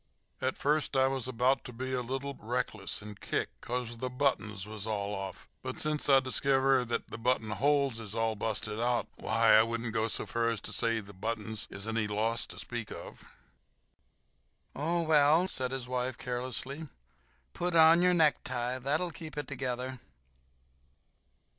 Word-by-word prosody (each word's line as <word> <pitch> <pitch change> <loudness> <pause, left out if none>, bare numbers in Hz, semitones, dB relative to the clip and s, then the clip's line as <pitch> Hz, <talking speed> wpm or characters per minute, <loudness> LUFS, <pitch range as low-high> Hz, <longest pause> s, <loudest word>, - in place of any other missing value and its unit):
"At 130 0 0
first 150 0 +1
I 130 - +5
was 135 -2 -1
about 130 +2 +2
ter 125 - -8
be 130 +2 -4
a 125 - +1
little 135 +3 -3
reckless 110 -4 -3
and 105 -1 -10
kick - - -1
'cause 120 -1 -3
ther 130 +2 -3
buttons 125 -7 0
was 105 0 -6
all 105 -2 -1
off, 95 -1 -6
but - - -5
since 150 -1 +1
I 135 -1 +8
diskiver 135 0 +3
that 115 0 -2
the 110 - -6
button 115 -2 +1
holes 135 +2 +2
is 110 -1 -6
all 115 -1 +1
busted 105 0 -3
out, 120 0 +1
why, - - +3
I 110 - +9
wouldn't 115 0 -2
go 110 0 +1
so - - -1
fur 115 0 0
as 115 -2 -1
to 105 - -6
say 115 +2 +1
the 100 0 -12
buttons 110 +1 -3
is 100 +2 -7
any 110 -1 0
loss 110 +3 0
to - - -11
speak 120 -2 -5
of." - - -9 1.5
"Oh, 170 +4 0
well," 155 +2 +5
said 130 -8 -1
his 130 -2 -3
wife, 125 0 -2
carelessly, 130 +4 -3 0.7
"put 175 0 -1
on 165 +1 +8
your 180 0 +4
necktie—that'll 135 +1 +1
keep 160 -3 -9
it 145 -2 -3
together." 130 -1 -3
125 Hz, 165 wpm, -31 LUFS, 110-135 Hz, 1.5 s, I